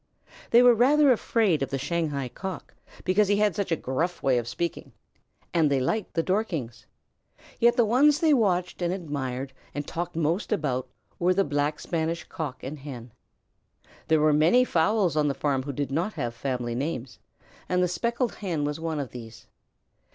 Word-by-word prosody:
They 240 +1 +6
were 245 -1 +8
rather 275 +5 +5
afraid 220 - +2
of 135 - -1
the 135 - -2
Shanghai 140 -1 -2
Cock 190 +9 -7 0.3
because 195 +3 +3
he 205 - +3
had 210 -3 +2
such 200 -1 -2
a - - +4
gruff 160 +6 -2
way 130 -2 +3
of 120 - -6
speaking, 165 +8 -4 0.6
and 160 -3 +3
they 140 -1 +2
liked 205 +11 -2
the 165 - +1
Dorkings, 160 - -2 0.7
yet 235 +1 +5
the 240 - +5
ones 280 +7 +4
they 320 -3 +4
watched 185 -8 +1
and 175 0 0
admired 140 -7 -4 0.2
and 145 0 -3
talked 175 +1 -4
most 165 +7 -1
about 135 -10 -1 0.3
were 180 +1 +2
the 195 - +3
Black 145 0 -1
Spanish 165 0 -2
Cock 150 -7 -6
and 140 +3 -6
Hen. 125 -4 -9 1.0
There 160 -1 +4
were 155 0 +4
many 170 +12 +4
fowls 180 - +2
on 150 -1 +2
the 140 - -1
farm 135 -1 0
who 140 +2 -5
did 140 0 -3
not 170 +9 -1
have 120 -1 -3
family 120 -1 -3
names, 130 -1 -4 0.5
and 180 0 +2
the - - +3
Speckled 235 +8 -1
Hen 170 -7 -3
was 150 +1 -2
one 160 -2 -3
of 140 -4 -4
these. 115 -2 -10
160 Hz, 180 wpm, -26 LUFS, 140-195 Hz, 1.0 s, were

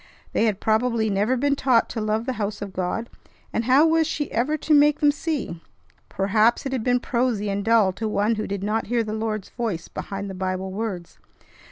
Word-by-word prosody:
They 225 - +2
had 210 -3 0
probably 220 0 +1
never 210 +6 +1
been 280 +2 +1
taught 255 -4 +3
to 225 - -4
love 215 +2 -1
the 260 - -1
house 205 +1 -2
of 200 -2 -6
God, 185 +6 -2 0.5
and 225 - -1
how 265 +5 +5
was 325 -1 +3
she 295 -3 -3
ever 270 +7 0
to 305 +1 0
make 295 0 +5
them 295 -1 +5
see? 285 - -4 0.5
Perhaps 215 +6 +2
it 270 - -2
had 255 -4 -2
been 245 0 +2
prosy 235 -5 -1
and 200 +1 -2
dull 220 -4 +4
to 220 +3 -3
one 210 +1 +1
who 215 -1 -3
did 195 -1 -4
not 215 +2 -1
hear 235 +1 +1
the 215 -1 -4
Lord's 215 -2 -3
voice 220 -9 -3
behind 200 0 -6
the 195 - -6
Bible 185 0 -3
words. 195 -4 -5
220 Hz, 210 wpm, -24 LUFS, 200-250 Hz, 0.5 s, how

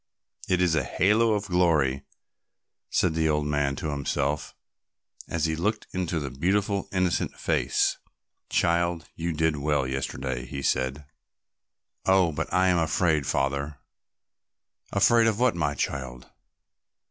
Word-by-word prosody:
"It 90 -1 +3
is 90 -3 +2
a 80 -4 +2
halo 110 - +2
of 105 -1 -1
glory," 80 -8 +2 0.9
said 90 -3 +1
the 80 0 +1
old 75 -1 +1
man 75 -1 0
to 75 +2 -3
himself 70 +1 -2 0.7
as 85 -1 0
he 80 0 0
looked 105 +6 -1
into 90 -3 -1
the 70 -3 -5
beautiful 100 +8 0
innocent 90 -2 0
face. - - +1 0.5
"Child, 85 -1 +1
you 85 +1 -2
did 80 -1 0
well 70 -1 0
yesterday," 65 -1 -3
he 70 0 -6
said. 65 +3 -1 1.0
"Oh, 95 -3 +4
but 75 - -4
I 95 0 +3
am 90 -1 +3
afraid, 80 -3 +1
Father." 70 +1 -1 1.1
"Afraid 115 +3 +4
of 110 -1 0
what, 125 -6 +3
my 75 -4 -1
child?" 65 -3 -4
80 Hz, 135 wpm, -26 LUFS, 70-90 Hz, 1.1 s, Oh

